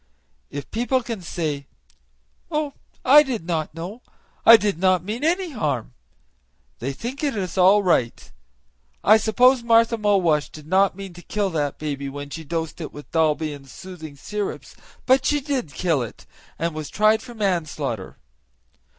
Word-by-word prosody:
If 145 0 -7
people 245 +2 0
can 230 -5 -5
say, 155 -5 -3 0.8
'Oh! 300 -3 -1 0.3
I 285 +4 +9
did 250 - -3
not 160 -3 -2
know, 185 +9 -7 0.5
I 230 - +11
did 205 -6 -1
not 185 -2 +3
mean 220 +8 -4
any 350 +2 +1
harm,' 145 - -2 0.9
they 135 +4 -2
think 240 - -6
it 285 -5 0
is 185 -4 -3
all 195 +2 +5
right. 115 - 0 0.7
I 215 +2 +7
suppose 245 +4 +4
Martha 230 0 +3
Mulwash 185 -8 +2
did 155 -1 -12
not 190 +3 +3
mean 195 -2 -8
to 175 - -12
kill 200 +1 -2
that 145 -4 -1
baby 140 -2 -4
when 145 +1 -7
she 160 - -6
dosed 165 +1 -4
it 155 - -6
with 145 - -12
Dalby 155 -1 +1
and 135 -2 -12
soothing 170 -3 -10
syrups; 205 +8 -5 0.3
but 260 0 +4
she 295 +2 +2
did 270 - -3
kill 165 -7 +1
it, 120 - -8 0.3
and 170 0 -1
was 155 -1 -5
tried 215 +1 +3
for 240 0 -11
manslaughter." 155 - -2
185 Hz, 160 wpm, -23 LUFS, 155-230 Hz, 0.9 s, I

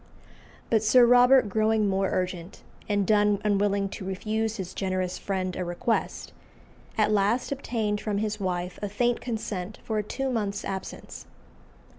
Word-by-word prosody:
But 220 -2 +4
Sir 240 +3 +6
Robert 250 0 +6
growing 215 +1 +2
more 195 0 +1
urgent, 180 -1 -3 0.3
and 205 -1 +1
Donne 205 0 +3
unwilling 200 -1 +2
to 190 - -7
refuse 215 +4 -2
his 185 -2 -5
generous 185 -2 -2
friend 185 -2 -2
a 185 - -2
request, 175 +6 -2 0.6
at 215 -1 +3
last 210 +6 +1
obtained 225 -6 -2
from 210 -2 -2
his 210 0 -2
wife 180 -2 -3
a 205 - -2
faint 240 +4 0
consent 215 -5 -4
for 220 -1 -1
a - - -1
two 270 +5 -3
months' 205 -4 -2
absence. 190 -1 -7
205 Hz, 150 wpm, -27 LUFS, 190-220 Hz, 0.6 s, Sir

